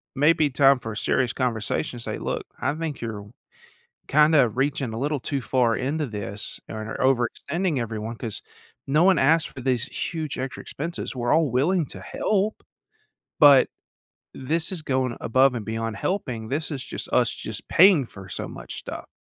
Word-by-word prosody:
maybe 150 +1 +4
time 135 0 +5
for 115 - -6
a - - -7
serious 125 +1 +1
conversation 120 -1 -1
to - - -7
say, - - -3
"Look, - - -3
I - - 0
think 155 -3 -4
you're 105 -2 -6 0.8
kinda 150 -4 +5
reaching 130 -1 -1
a - - -4
little 145 0 -1
too 135 +1 -2
far 120 -2 +2
into 145 +3 -1
this, 105 -2 -5
or 110 0 -5
overextending 135 +6 0
everyone 115 0 -4
'cause 110 -3 -5 0.5
no 150 +5 +3
one 185 -5 +5
asked 160 +4 +3
for 130 - -9
these 125 -1 0 0.3
huge 155 -5 -4
extra 130 0 -4
expenses. 165 -1 -5
We're 120 -1 0
all 160 -5 +3
willing 155 +7 +2
to - - -9
help, 210 +1 -1 0.8
but 140 -3 +8 0.7
this 160 +7 -2
is 165 - -4
going 130 -3 0
above 130 +2 +3
and 110 -4 -4
beyond 115 -1 -3
helping, 120 - -3
this 150 +4 -2
is 135 -4 -4
just - - -6
us - - +3
just - - -7
paying 175 -7 +6
for 95 -4 -12
so - - -4
much - - -8
stuff." - - -7
130 Hz, 170 wpm, -25 LUFS, 115-155 Hz, 0.8 s, but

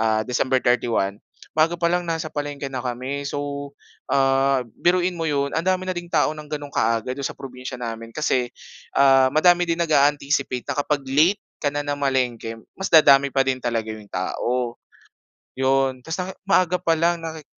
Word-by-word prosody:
ah, 110 -1 +2
December 130 +2 0
31, 115 -5 +1 0.4
bago 160 +2 +3
pa 170 - +3
lang, 180 0 0
nasa 165 -1 -2
palengke 145 -1 -4
na 130 -2 -5
kami. 130 +3 -4
So, 140 0 -4 0.4
ah, 135 0 +3 0.2
biruin 180 0 +2
mo 165 - -2
yon, 140 -2 0
ang 165 +2 -1
dami 185 0 +1
na 185 - -2
ding 175 0 -5
tao 150 -2 +3
nang 155 -1 -9
gano'ng 145 -1 -5
kaaga, 115 +2 0
do'n 140 -1 -3
sa - - -5
probinsya 130 -2 -8
namin. 115 -1 -6
Kasi, 130 -5 0 0.5
ah, 135 -1 +6
madami 175 +2 +4
din 170 0 -1
nag-a-anticipate 145 -4 +1
na - - -2
kapag 145 0 0
late 160 +9 +3 0.2
ka 145 - +1
na 145 0 -3
namalengke, 130 -5 -1 0.2
mas 190 - -4
dadami 140 -3 +6
pa 135 0 +1
din 130 -1 -1
talaga 115 -2 -2
yung 110 -1 -11
tao, 120 +6 -2 0.7
'yon. 130 0 +1
Tas' 160 +6 -5
na 185 +1 -4 0.2
maaga 180 -2 +3
pa 165 -1 +2
lang 170 +1 +1
naki 160 -1 -6
140 Hz, 175 wpm, -23 LUFS, 125-160 Hz, 0.7 s, ah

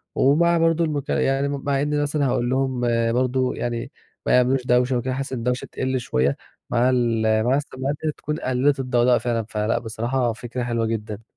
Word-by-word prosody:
ومع 170 +5 +4
برضه 165 0 +2
المك 145 -3 -2
يعني 135 +1 +1
مع 140 -1 -1
إني 150 0 0
مثلًا 145 0 0
هاقول 120 -1 0
لهم 130 -1 0 0.3
برضه 130 +1 0
يعني 120 -1 -3 0.3
ما - - +1
يعملوش 125 +1 +2
دوشة 125 +1 +2
و - - -1
كده، 130 +2 -3
بحيث 135 +1 -4
إن - - -2
الدوشة 125 +2 -2
تِقلّ 130 0 -1
شوية 70 - 0 0.3
مع 120 +1 +2
ال 120 -3 +1 0.2
مع 125 +3 +2
السماعات 140 0 -3
ديّة 155 - +1
تكون 150 +1 -5
قللت 135 +2 +1
الضوضاء 125 -1 +3
فعلًا، 115 -3 -1
فلأ 105 +2 0
بصراحة 120 +2 -1
فكرة 120 +1 -5
حلوة 115 -1 -1
جدًا. 110 -1 -4
125 Hz, 185 wpm, -23 LUFS, 120-140 Hz, 0.3 s, ومع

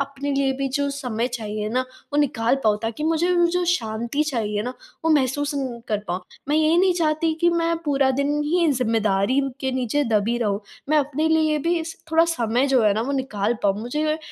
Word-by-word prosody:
अपने 280 +1 -3
लिए 275 -1 +1
भी 275 0 -1
जो 285 0 0
समय 250 -4 -2
चाहिए 215 -3 -4
ना, 250 +3 0 0.3
वो - - 0
निकाल 240 -3 +1
पाऊँ 210 -1 +3
ताकि 225 +4 -4
मुझे 325 +2 +1
वो 345 0 +5
जो 360 +1 0
शांति 235 -5 -1
चाहिए 215 -8 -1
ना, 250 +2 -4 0.3
वो 325 - +3
महसूस 290 0 +1
न 260 -4 -3
कर 210 - +1
पाऊँ। 180 +2 -2 0.3
मैं 295 - +2
ये 310 0 +3
ही 335 - +4
नहीं 370 0 +4
चाहती 320 -1 +1
कि 345 0 +4
मैं 335 0 +1
पूरा 275 -2 +2
दिन 280 +3 0
ही 340 +3 +2
ज़िम्मेदारी 225 -1 +1 0.2
के 265 - -1
नीचे 260 +3 0 0.2
दबी 235 +3 0
रहूँ, 205 -4 0 0.3
मैं 305 +1 +4
अपने 295 +2 0
लिए 315 -1 +2
भी 335 +3 0
स 325 - -8
थोड़ा 325 +1 +5
समय 245 -6 0
जो 265 -3 +3
है 210 -1 +4
ना 215 - 0
वो 275 +4 -2
निकाल 235 -5 -1
पाऊँ, 200 0 +1
मुझे 305 +6 -1
275 Hz, 215 wpm, -23 LUFS, 230-310 Hz, 0.3 s, वो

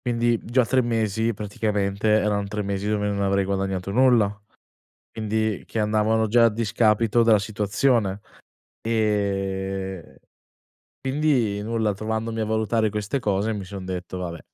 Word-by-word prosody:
quindi 120 -1 +1
già 125 +1 +2
3 130 +1 +2
mesi 115 -1 0
praticamente 105 0 -2
eran 105 -1 +2
3 105 +1 -3
mesi 100 0 -3
dove 105 -1 0
non 100 -1 -1
avrei 100 0 +2
guadagnato 95 -1 -2
nulla, 120 -2 +4 0.8
quindi 110 -1 -2
che 115 - -4
andavano 110 +1 +2
già 115 +2 +5
a 115 - +5
discapito 115 +1 +2
della 110 -2 +5
situazione. 105 0 0 0.6
Ehm, 95 -4 -2 0.9
quindi 130 -7 0
nulla, 110 -2 -1
trovandomi 110 +2 -3
a 110 - +1
valutare 110 0 0
queste 105 +6 -2
cose 105 +1 0
mi 100 -2 -5
son 95 -1 -8
detto: 90 0 -5
"Vabbè" 85 -2 -5
105 Hz, 135 wpm, -24 LUFS, 100-115 Hz, 0.9 s, già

